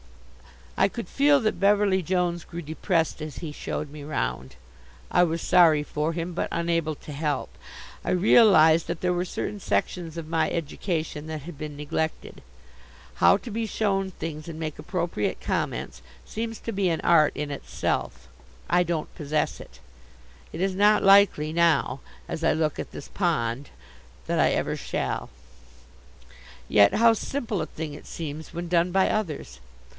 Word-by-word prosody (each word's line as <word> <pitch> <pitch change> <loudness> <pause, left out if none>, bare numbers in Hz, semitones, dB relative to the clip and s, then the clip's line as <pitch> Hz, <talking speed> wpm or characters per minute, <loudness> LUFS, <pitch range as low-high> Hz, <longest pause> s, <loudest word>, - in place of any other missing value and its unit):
I - - +4
could - - -6
feel 285 +1 +4
that 215 - -1
Beverly 200 -1 +3
Jones 175 0 0
grew 170 0 -7
depressed 160 +1 -1
as 155 -3 -6
he 160 -3 -5
showed 150 0 -5
me 150 -1 -9
round. 65 - -3 0.6
I - - +4
was 165 -1 0
sorry 160 -4 +5
for 150 +2 -2
him, 170 +1 -4
but - - -1
unable 165 -2 0
to 150 - -11
help. 145 -1 -2 0.5
I - - -3
realized 175 -5 +5
that 170 -1 -4
there 180 0 +1
were 175 +1 -1
certain 205 +3 -4
sections 170 -3 -2
of 165 -2 -5
my 160 -1 +1
education 160 -1 -3
that 155 -2 -5
had 170 +1 -8
been 150 0 -7
neglected. 155 +2 -3 0.7
How 195 - +5
to 230 +3 -9
be 225 +1 -2
shown 195 -3 0
things 155 -3 -7
and 160 -1 -7
make 155 -2 -5
appropriate 170 - -2
comments - - -3 0.2
seems 225 0 -4
to 230 - -4
be 195 -3 +1
an 165 - -1
art 155 -3 +4
in 150 0 -3
itself. 140 - -3 0.4
I 175 +1 +3
don't 170 -3 -2
possess 150 0 -2
it. - - -13 0.7
It 165 - -5
is 190 0 +1
not 210 +2 +4
likely 195 -6 +5
now, 160 -6 +2 0.3
as 165 - -5
I 165 - +4
look 155 -2 -1
at - - -5
this - - -9
pond, 140 - -1 0.6
that - - 0
I - - +5
ever - - -1
shall. - - -3 1.4
Yet 100 -1 +5
how 230 +1 +6
simple 225 - -3
a 155 - -3
thing 155 -2 -6
it 145 - -11
seems 155 -1 -6
when 170 +1 -5
done 175 +1 +2
by 190 +1 +3
others. 160 - -3
165 Hz, 165 wpm, -26 LUFS, 155-185 Hz, 1.4 s, how